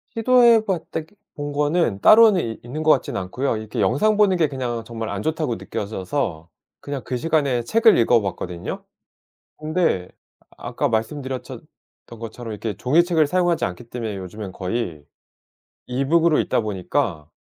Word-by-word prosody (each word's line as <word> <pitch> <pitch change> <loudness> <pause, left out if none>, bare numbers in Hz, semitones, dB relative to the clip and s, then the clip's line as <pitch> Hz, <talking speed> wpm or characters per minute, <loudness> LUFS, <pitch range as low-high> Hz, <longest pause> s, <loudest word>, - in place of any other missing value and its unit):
시도해 235 -1 +5
봤다기 165 -2 -4 0.2
본 145 -1 -5
거는 145 - +1
따로는 215 -5 +7
있 115 -1 -5
있는 150 +6 -5
것 155 - +5
같지는 130 - +1
않고요. 120 +7 -2
이렇게 110 -1 -6
영상 210 - +2
보는 200 -3 +4
게 160 - +3
그냥 120 -4 -3
정말 115 -1 -6
안 100 0 -4
좋다고 155 -5 -1
느껴져서 100 - -4 0.3
그냥 140 -2 -5
그 130 - -3
시간에 140 -5 +1
책을 225 - +4
읽어봤거든요. 100 -7 0 0.8
근데 155 - 0 0.5
아까 - - -2
말씀드렸전 130 +3 -4 0.4
던 115 - -12
것처럼 115 0 -7
이렇게 105 -1 -4
종이책을 160 - +3
사용하지 175 +1 +1
않기 90 +6 -5
때문에 115 -3 -5
요즘엔 95 +1 -7
거의 90 -5 -4 0.8
이북으로 150 +6 +2
읽다 - - 0
보니까 95 - -2
130 Hz, 340 characters per minute, -22 LUFS, 110-160 Hz, 0.8 s, 따로는